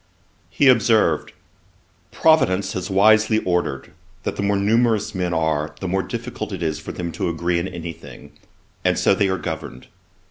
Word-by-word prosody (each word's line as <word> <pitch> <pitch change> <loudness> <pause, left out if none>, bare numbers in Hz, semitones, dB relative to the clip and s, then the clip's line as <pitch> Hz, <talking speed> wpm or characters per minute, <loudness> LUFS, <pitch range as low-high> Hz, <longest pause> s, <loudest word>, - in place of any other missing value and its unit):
He 140 - +2
observed, 110 - +3 0.8
'Providence 100 - +2
has 90 -1 -4
wisely 110 +3 +4
ordered 85 -6 -1 0.3
that - - -3
the - - -3
more 100 0 +1
numerous 110 +1 +1
men 90 -2 -2
are, 80 -2 -1
the 95 - -4
more 95 +2 0
difficult 120 -1 -6
it 95 -3 -4
is 80 -1 -2
for - - -7
them 85 -1 -5
to 85 - -2
agree 85 +1 -1
in 85 - -3
any 85 -2 -6
thing, 70 -2 -13 0.5
and - - +2
so - - +3
they 100 -1 +1
are 95 - 0
governed. 65 -7 -6
95 Hz, 170 wpm, -21 LUFS, 85-110 Hz, 0.8 s, wisely